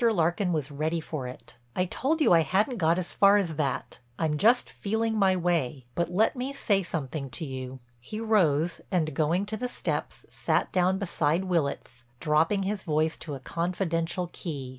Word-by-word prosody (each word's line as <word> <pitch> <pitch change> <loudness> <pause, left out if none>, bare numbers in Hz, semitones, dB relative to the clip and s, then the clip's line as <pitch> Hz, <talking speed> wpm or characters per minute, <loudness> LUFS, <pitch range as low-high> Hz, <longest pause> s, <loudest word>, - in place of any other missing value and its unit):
Larkin 175 0 +1
was 150 -3 -2
ready 155 +4 -1
for 155 -5 -5
it: 125 0 -11 0.2
"I 180 - +2
told 285 - -1
you 290 - +5
I 165 - +6
hadn't 210 - +1
got 165 -2 +3
as 180 -1 -4
far 200 +1 +6
as 175 -6 0
that; 140 -4 -2 0.2
I'm 150 -2 0
just 235 +6 +4
feeling 220 +2 -1
my 195 -3 +4
way. 165 -7 0
But 170 -1 -1
let 205 +9 +2
me 260 +2 -3
say 205 -7 +1
something 150 -5 -4
to 130 +6 -5
you." 130 -1 -6 0.2
He 215 - -7
rose 175 -8 +2
and, 160 -5 0
going 170 +5 +1
to 215 +1 -4
the 250 +3 -2
steps, - - -4
sat - - 0
down 185 +1 +2
beside 170 -3 0
Willitts, 140 -9 -2 0.2
dropping 160 +6 +2
his 200 +1 -2
voice 155 -1 +1
to 150 -3 -6
a - - -7
confidential 170 +2 -2
key. 140 -7 -5
170 Hz, 185 wpm, -28 LUFS, 150-195 Hz, 0.2 s, I